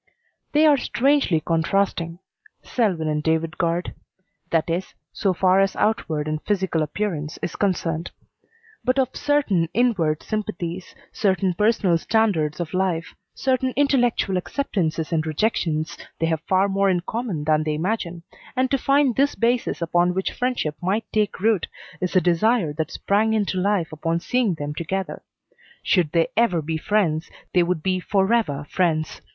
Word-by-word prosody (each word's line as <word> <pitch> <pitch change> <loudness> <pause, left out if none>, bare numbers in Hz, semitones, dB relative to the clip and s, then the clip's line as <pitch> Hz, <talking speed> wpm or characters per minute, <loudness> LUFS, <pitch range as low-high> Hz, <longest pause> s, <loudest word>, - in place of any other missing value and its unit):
They 305 +1 +5
are 295 -2 +6
strangely 270 - +2
contrasting 170 +1 0 0.5
Selwyn 190 -10 0
and 150 0 0
David 160 +2 -1
Guard. 170 0 0 0.6
That 165 -2 +1
is, 175 +3 -3 0.2
so 195 - +1
far 185 +1 +3
as 195 0 +2
outward 160 -8 0
and 155 0 -2
physical 190 -5 0
appearance 155 -1 -3
is - - -3
concerned. 170 -4 -1 0.7
But 255 +1 +1
of 265 -2 +1
certain 215 - +1
inward 195 -11 +1
sympathies, 180 -4 -4 0.2
certain 190 -4 +1
personal 200 -3 +2
standards 170 -9 +1
of 170 -3 -4
life, 185 -3 -1 0.2
certain 260 -1 0
intellectual 245 -8 +2
acceptances 175 - -2
and 160 -1 +1
rejections, 160 -2 0 0.2
they 165 - 0
have 160 -1 0
far 190 +1 +3
more 195 0 +2
in 180 -2 +1
common 210 -5 -3
than 155 0 +2
they 155 -1 -1
imagine, 175 -1 -2 0.3
and 255 0 +1
to 275 - +2
find 275 -3 +3
this 280 +2 +2
basis 235 -6 0
upon 175 +2 +2
which 190 - -1
friendship 245 -12 -1
might 200 +5 0
take 210 -2 0
root 215 -3 +2 0.3
is 180 +1 -2
a 185 - +6
desire 175 0 +2
that 155 +1 -2
sprang 215 +2 +1
into 200 -3 0
life 190 -4 0
upon 165 +2 -1
seeing 230 0 0
them 145 -1 -4
together. 190 +5 -3 0.6
Should 175 -6 +2
they 165 -1 +2
ever 180 -9 +2
be 160 +1 -2
friends, 170 -5 0 0.2
they 180 - +5
would 170 -2 -1
be 185 -1 +1
forever 190 -7 +1
friends. 160 -3 0
185 Hz, 155 wpm, -23 LUFS, 165-220 Hz, 0.7 s, are